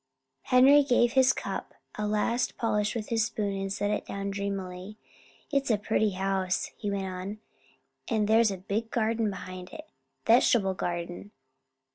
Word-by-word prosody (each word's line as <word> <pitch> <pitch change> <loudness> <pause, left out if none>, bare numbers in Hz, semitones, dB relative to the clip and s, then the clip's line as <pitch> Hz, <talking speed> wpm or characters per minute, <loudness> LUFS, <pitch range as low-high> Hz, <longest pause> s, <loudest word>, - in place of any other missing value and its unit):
Henry 265 - +6
gave 245 -3 +3
his 260 -1 +5
cup - - -5 0.2
a 210 0 -3
last 215 +4 0
polish 210 -1 0
with 220 -2 -4
his 225 -1 +2
spoon 210 -4 -2
and 195 0 -3
set 205 +1 -1
it 210 - -1
down 200 0 -4
dreamily. 195 0 -5 0.5
"It's 275 -2 +1
a 220 - +3
pretty 215 0 0
house," 190 -1 -1
he 205 - -4
went 200 -1 -2
on, 185 +2 -5 0.7
"and 220 -3 +1
there's 225 +1 +5
a 195 - -4
big 210 +5 -3
garden 225 -1 0
behind 185 -1 -7
it - - -10 0.4
vegetable 225 -4 +4
garden. 175 +1 -4
210 Hz, 155 wpm, -28 LUFS, 195-230 Hz, 0.7 s, Henry